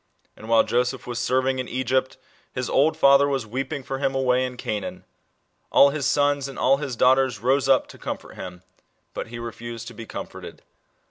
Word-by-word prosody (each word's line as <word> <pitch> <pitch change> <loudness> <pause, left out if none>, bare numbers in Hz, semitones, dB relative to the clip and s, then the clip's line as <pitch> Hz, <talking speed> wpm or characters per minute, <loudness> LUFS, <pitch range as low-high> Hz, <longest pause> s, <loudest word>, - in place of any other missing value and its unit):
And 110 - -11
while 115 -1 +5
Joseph 125 +1 -1
was 120 -1 -4
serving 130 +1 +1
in 130 - -3
Egypt 130 +1 -1 0.4
his 125 -1 -3
old 150 +4 +3
father 140 +1 +6
was 135 -4 -1
weeping 135 +5 -4
for 135 +1 -4
him 135 -1 0
away 130 -1 +2
in 125 -1 -9
Canaan. 105 -4 -4 0.7
"All 140 - +6
his 140 -2 -1
sons 145 -1 +2
and 135 - -9
all 135 +1 +3
his 140 -3 -4
daughters 130 0 +3
rose* 135 +4 +1
up 135 - +4
to - - -13
comfort - - -6
him; 90 -1 -9 0.5
but - - -5
he 115 +1 -8
refused 115 0 -7
to - - -12
be 115 0 -9
com - - -5
forted." - - -11
130 Hz, 195 wpm, -24 LUFS, 120-135 Hz, 0.7 s, father